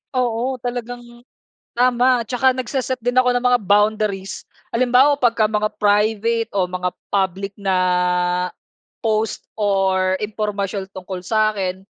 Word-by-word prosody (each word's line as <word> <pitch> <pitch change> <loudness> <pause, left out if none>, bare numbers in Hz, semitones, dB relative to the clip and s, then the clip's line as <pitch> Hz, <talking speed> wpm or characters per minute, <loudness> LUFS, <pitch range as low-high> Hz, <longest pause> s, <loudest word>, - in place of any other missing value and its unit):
Oo, 250 +1 0
talagang 245 0 -5 0.7
tama, 250 0 +3
at - - -15
'tsaka 255 +1 +3
nagse-set 255 0 -3
din 245 +1 -1
ako 250 -1 +4
ng 245 - 0
mga 250 0 +4
boundaries. 205 -1 +1 0.3
Halimbawa 255 +4 +3
'pag 240 -4 +2 0.2
mga 215 0 +1
private 220 +2 +1
o 185 -2 +1
mga 180 0 -2 0.2
public 195 0 -1
na 195 -2 0 1.3
post 220 0 -1
or 190 -2 +1
impormasyon 205 -2 -3
tungkol 185 -1 -7
sa'kin, 195 -2 0
215 Hz, 120 wpm, -20 LUFS, 195-245 Hz, 1.3 s, ako